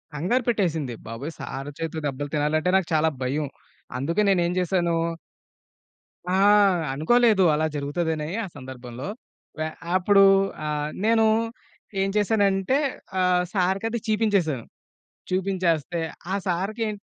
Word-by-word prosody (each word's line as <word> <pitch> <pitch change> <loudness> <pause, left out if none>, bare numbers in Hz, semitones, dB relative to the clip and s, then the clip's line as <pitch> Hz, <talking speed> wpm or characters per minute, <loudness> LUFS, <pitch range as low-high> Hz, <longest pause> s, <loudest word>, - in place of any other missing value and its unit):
కంగారు 195 - +1
పెట్టేసింది. 165 - 0
బాబోయ్! 125 +8 -6
సారు 135 +2 -6
చేతిలో 160 -1 -3
దెబ్బలు 145 +1 -4
తినాలంటే, 155 +3 +1
నాకు 190 -3 -1
చాలా 160 +1 +3
భయం. 145 +4 -1 0.5
అందుకే 165 +10 0
నేనేం 175 -2 +2
చేశాను 175 -1 +1 1.4
ఆ! - - +3 0.6
అనుకోలేదు. 210 - +4
అలా 155 +1 +1
జరుగుతదని 150 +2 -2 0.2
ఆ - - -4
సందర్భంలో. 130 0 -8 0.5
వె 155 - -1 0.3
అప్పుడు 195 +2 +5 0.4
ఆహ్, 150 0 -2
నేను 225 0 +4 0.8
ఏం 195 - +1
చేశానంటే 205 +2 +2 0.4
ఆహ్, 180 -1 +3
సారుకది 195 +5 0
చీపించేసాను. 200 - +1 0.7
చూపించేస్తే, 180 -4 0 0.3
ఆ - - +1
సారుకేన్ 205 +4 -2
175 Hz, 110 wpm, -25 LUFS, 150-195 Hz, 1.4 s, అప్పుడు